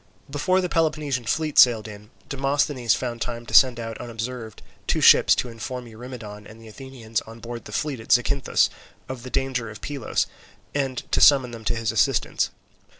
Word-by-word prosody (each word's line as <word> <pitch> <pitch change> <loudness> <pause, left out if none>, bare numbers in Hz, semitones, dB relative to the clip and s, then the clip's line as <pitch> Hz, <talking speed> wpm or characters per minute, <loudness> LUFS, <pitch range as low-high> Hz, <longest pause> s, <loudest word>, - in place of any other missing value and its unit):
Before 185 +6 +1
the 180 - -1
Peloponnesian 155 -7 -1
fleet 155 +5 0
sailed 115 -3 +6
in, 105 0 -11 0.2
Demosthenes 135 -3 0
found 120 -2 -5
time 120 0 -4
to - - -10
send 125 -3 +6
out 115 -1 -6
unobserved 115 -1 -6 0.2
two - - +1
ships - - +7
to - - -2
inform 120 +2 -6
Eurymedon 110 -3 -10
and 110 +1 -14
the 115 - -14
Athenians 115 -1 -5
on 115 +1 -11
board 120 0 -8
the - - -10
fleet 145 -5 -2
at 110 - -8
Zacynthus 135 +2 +2 0.4
of 130 -2 -6
the 130 - -8
danger 125 -4 -2
of 110 +1 -10
Pylos 140 -5 -2 0.5
and 135 -3 -2
to - - +2
summon 135 -4 +6
them 115 -1 -9
to - - 0
his 115 -2 -1
assistance. 110 -5 +1
120 Hz, 180 wpm, -24 LUFS, 115-135 Hz, 0.5 s, ships